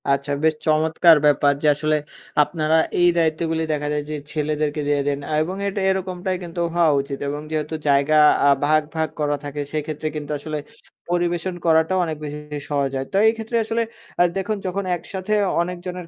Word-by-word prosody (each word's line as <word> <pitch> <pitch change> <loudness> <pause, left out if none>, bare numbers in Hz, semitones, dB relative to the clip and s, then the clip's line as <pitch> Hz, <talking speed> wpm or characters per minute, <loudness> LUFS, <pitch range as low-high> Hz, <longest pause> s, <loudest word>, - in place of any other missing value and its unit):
আচ্ছা 140 +1 0
বেশ 160 0 +3
চমৎকার 160 +1 +5
ব্যাপার। 145 -1 +4
যে - - +3
আসলে 155 +1 +1 0.5
আপনারা 155 0 0 0.2
এই 175 - +6
দায়িত্বগুলি 160 0 0
দেখা 150 0 -2
যায়। 150 0 -1
যে 155 - -3 0.2
ছেলেদেরকে 150 0 -1
দিয়ে 145 -1 +2
দেন 140 -1 0 0.2
এবং 175 +4 -2
এটা 200 0 -2
এরকমটাই 185 -1 -2
কিন্তু 170 0 -5
হওয়া 170 -3 +4
উচিত 140 0 -6
এবং 145 +1 -4
যেহেতু 155 0 -2
জায়গা 140 +2 +4 0.3
আ - - +6 0.2
ভাগ, 155 +1 +4
ভাগ 160 -1 0
করা 145 -1 +1
থাকে। 145 0 -4
সেক্ষেত্রে 155 0 -3
কিন্তু 150 -1 -5
আসলে 155 +1 -4 0.5
পরিবেশন 175 +1 -1
করাটাও 160 +3 +3
অনেক 160 -2 -4
বেশি 150 0 -5 0.3
সহজ 140 -2 0
হয়। 135 - -3
তো - - +2
এই 220 - +4
ক্ষেত্রে 225 +1 -2
আসলে 225 +1 -1 0.4
আ - - +8
দেখুন 210 +2 -1
যখন 195 +2 -2
একসাথে 185 +4 -4 0.3
অনেকজনের 180 0 -5
160 Hz, 175 wpm, -22 LUFS, 150-175 Hz, 0.5 s, আ